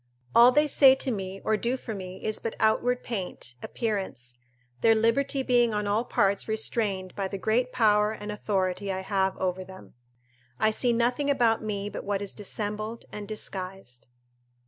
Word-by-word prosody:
All 240 +2 +8
they 295 +3 +3
say 270 -2 +7
to 265 0 -3
me 195 -2 -5
or 220 - +3
do 240 +4 -1
for 235 -3 -6
me 185 -2 -7
is 215 - 0
but 230 - -4
outward 245 +3 +2
paint, 185 - -4
appearance, 190 - -3 0.4
their 225 0 +5
liberty 250 +5 +1
being 240 -3 +3
on 210 0 -1
all 210 +4 +1
parts 200 -3 +1
restrained 215 -4 -1
by 195 -1 -2
the 195 - -5
great 230 +6 +1
power 210 -2 +3
and 210 -1 -6
authority 195 -2 -1
I 190 0 -3
have 190 -1 0
over 185 0 -2
them. 190 0 -13 0.7
I 215 - +3
see 240 +3 +1
nothing 245 +5 +1
about 235 -5 +2
me 205 -2 -3
but - - -6
what 200 0 -1
is 200 - -4
dissembled 215 +2 -4
and 210 -1 -7
disguised. 185 - -6
210 Hz, 170 wpm, -27 LUFS, 195-230 Hz, 0.7 s, All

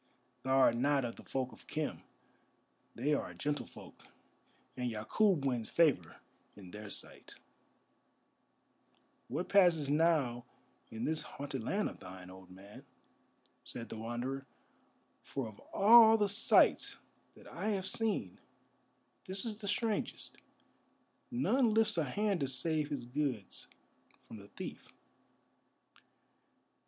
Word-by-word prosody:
Thou 130 +1 +1
art 130 -3 +5
not 140 +1 +2
of 115 - -5
the - - -13
folk 130 -1 -3
of - - -16
Khem. - - -3 0.9
They 140 +6 0
are - - -1
a - - -12
gentle 145 0 -2
folk, - - -14 0.7
and 125 -1 -2
Yakûb 145 - +1
wins 120 -4 -1
favour 140 - +2 0.4
in 95 -3 -12
their 105 +1 -8
sight." - - -5 1.9
"What 155 +9 -3
passes 170 -8 +4
now 150 -7 +2 0.4
in 110 +1 -6
this 160 0 -1
haunted 140 -2 -6
land 205 - 0
of - - -9
thine, 90 -1 -10
old 95 -1 -14
man?" 95 +3 -13 0.8
said 115 -1 -7
the - - -6
Wanderer, 125 +4 -4 0.7
"for 135 -4 -5
of 105 -2 -12
all 225 +2 +8
the 205 -2 +1
sights 205 +3 +4 0.4
that - - -17
I - - -5
have 195 -3 -1
seen, 210 - -1 0.9
this 190 +4 -2
is 220 -3 -4
the 210 -2 -8
strangest. 220 +1 -2 0.9
None 240 -2 +2
lifts 220 -6 +3
a 155 - +1
hand 200 +7 0
to 140 - 0
save 150 +3 +1
his 140 -5 -4
goods 125 -5 -3 0.6
from 110 - -11
the 100 -1 -13
thief." 100 - -9
140 Hz, 130 wpm, -33 LUFS, 115-195 Hz, 1.9 s, all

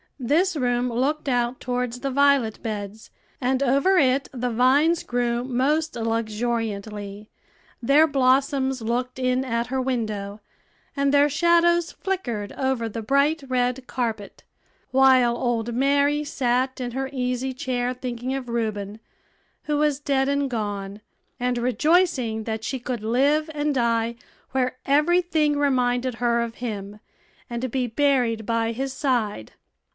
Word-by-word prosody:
This 320 +9 +1
room 245 -2 0
looked 275 +6 -1
out 245 0 0
towards 250 -1 -3
the 275 +1 -3
violet 280 -5 +2
beds, 210 0 -6 0.3
and 260 +1 0
over 280 +9 +3
it 270 -2 +2
the 250 -1 -3
vines 280 +8 +3
grew 240 0 -1
most 270 +5 0
luxuriantly; 215 -2 -3 0.5
their 285 +6 +5
blossoms 265 -2 +1
looked 245 +3 -2
in 255 0 +1
at 235 -2 -2
her 260 +1 -1
window, 215 -5 -3 0.6
and 280 -1 +1
their 285 +1 +4
shadows 340 +2 +3
flickered 240 - -3
over 260 -3 -1
the 225 +1 -5
bright 280 +6 +2
red 250 0 0
carpet; 225 -5 -4 0.5
while 260 -2 +5
old 240 -1 -1
Mary 285 +3 +2
sat 260 -2 -1
in 245 -1 -3
her 265 +2 -3
easy 255 0 -2
chair 250 -1 -2
thinking 250 0 -4
of 260 -3 -5
Reuben, 215 -3 -3 0.6
who 300 -1 -1
was 295 -2 +1
dead 275 -2 +1
and 280 -1 0
gone, 205 -3 -4 0.4
and 250 0 0
rejoicing 255 -3 +1
that 220 -1 -4
she 265 - -3
could 245 -2 -4
live 285 +7 +2
and 295 0 0
die 235 -2 +1 0.4
where 255 -1 -1
every 305 +6 +3
thing 310 -4 +1
reminded 255 -3 +1
her 235 0 +1
of 235 0 -4
him, 210 -4 -6 0.5
and 240 +2 -3
be 255 0 0
buried 245 -3 +1
by 230 -1 0
his 265 +3 -3
side. 240 - -1
250 Hz, 140 wpm, -24 LUFS, 235-275 Hz, 0.6 s, their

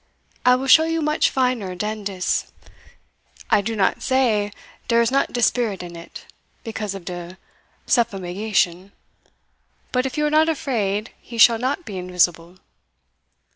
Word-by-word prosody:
I 250 0 +6
will 260 +1 -3
show 315 +4 +7
you 325 0 -1
much 300 +1 +2
finer 250 -8 -1
dan 210 +3 -4
dis. 190 -2 -2 1.0
I - - +5
do 225 +3 -3
not 200 -3 +1
say 230 -6 +1 0.4
dere 235 -1 +3
is 230 - 0
not 275 +1 +1
de 240 - -1
spirit 220 -8 +1
in 175 -1 -9
it, 170 0 -11 0.4
because 215 -3 -4
of 190 -3 -9
de 175 0 -7 0.5
suffumigation; 195 -3 0 1.0
but, 255 +1 +1
if 265 - -7
you 300 - +1
are 300 - 0
not 310 +1 +4
afraid, 220 -9 -2
he 235 - -10
shall 230 0 +6
not 275 +8 -2
be 195 -3 -6
invisible." 180 -1 0
215 Hz, 150 wpm, -22 LUFS, 185-255 Hz, 1.0 s, show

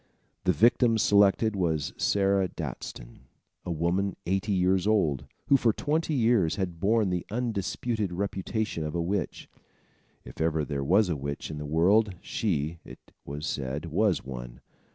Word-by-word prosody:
The 90 - +5
victim 115 +3 +4
selected 105 +1 +4
was 80 -6 -1
Sarah 100 -1 +2
Daston, 60 -6 -7 0.4
a - - -6
woman 85 +4 0
eighty 95 +4 0
years 95 0 +2
old, 75 -11 +1 0.2
who, 140 - +5
for 120 -3 +3
twenty 155 +6 -1
years, 115 - +3
had 90 -4 -3
borne 105 +1 +2
the 90 -1 -1
undisputed 110 -2 -2
reputation 100 0 -2
of 75 +1 -4
a - - 0
witch. 95 +3 -3 0.8
If - - -9
ever 80 -2 +1
there 70 -1 -3
was 95 +7 +3
a 85 - 0
witch 70 +2 -5
in 75 - -6
the 75 - -5
world, 95 +6 +3
she, 85 -7 -2
it - - -14
was 75 +2 -5
said, 70 0 -3
was 100 +1 +2
one. - - -8
95 Hz, 155 wpm, -28 LUFS, 80-105 Hz, 0.8 s, The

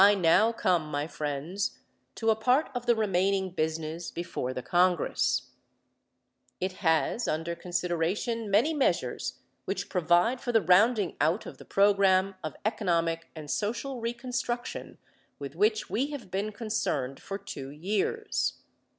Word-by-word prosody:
I 205 +1 +7
now 190 +5 +4
come, 175 -8 +1
my 145 0 -1
friends, 155 +5 -3 0.4
to 225 -1 +2
a - - +3
part 250 +7 +2
of 245 -1 -4
the 240 - +5
remaining 195 -2 +1
business 160 0 -2
before 165 -6 -4
the 130 -1 -5
Congress. 180 -2 +2 1.1
It 185 +1 -1
has 160 +7 +2
under 160 +2 -1
consideration 180 +6 -1
many 225 +11 +3
measures 125 - 0 0.3
which 195 +1 -3
provide 180 +8 +2
for 245 - -2
the 225 - +5
rounding 200 +3 +4
out 160 +8 +2
of - - -9
the - - -12
program 195 -1 +4
of 155 - -4
economic 170 -6 0
and 155 -2 -8
social 240 +4 -2
reconstruction 240 +1 -3 0.4
with 140 0 -7
which 215 +3 +2
we 260 +6 0
have 285 -10 -8
been 200 +3 -1
concerned 200 - -2
for 195 - -5
two 135 -8 -7
years. 205 - -1
190 Hz, 140 wpm, -29 LUFS, 165-225 Hz, 1.1 s, I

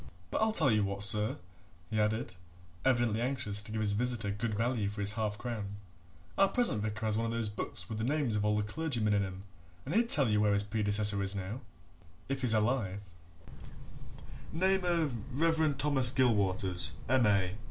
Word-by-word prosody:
But - - -1
I'll 220 0 +2
tell 155 - +3
you 105 -1 +2
what, 100 0 0
sir," 105 0 +5 0.6
he 110 - 0
added, 105 0 -1 0.5
evidently 120 -4 +1
anxious 120 -6 0
to 105 - -6
give 110 0 -2
his 105 -1 +1
visitor 120 -2 0
good 105 +1 -3
value 115 -2 -1
for 105 +1 -8
his 100 0 +3
half 110 -1 -2
crown, 105 -5 -5 0.6
"our 195 - +6
present 240 - +2
vicar 110 +1 -4
has 110 -1 +1
one 115 0 -1
of - - -3
those 115 -2 -1
books 105 - -5
with 110 -2 -5
the - - -2
names 135 -3 0
of 105 - 0
all 105 0 +1
the 105 - 0
clergymen 115 -2 -1
in 100 -1 +2
'em, 95 0 -7 0.4
and 145 - -4
he'd 230 +3 +2
tell 140 - +4
you 105 -1 +2
where 105 -1 +2
his 100 0 +1
predecessor 105 -1 +1
is 100 +1 -2
now, 100 +6 -5 0.7
if 135 0 -2
he's 120 -3 +3
alive 105 -3 0 1.5
name 190 +3 +1
of 145 - -2
Reverend 160 -3 +2
Thomas 135 -3 +3
Gilwaters, 100 -7 +2
M.A. 105 -7 +2
110 Hz, 185 wpm, -31 LUFS, 105-130 Hz, 1.5 s, our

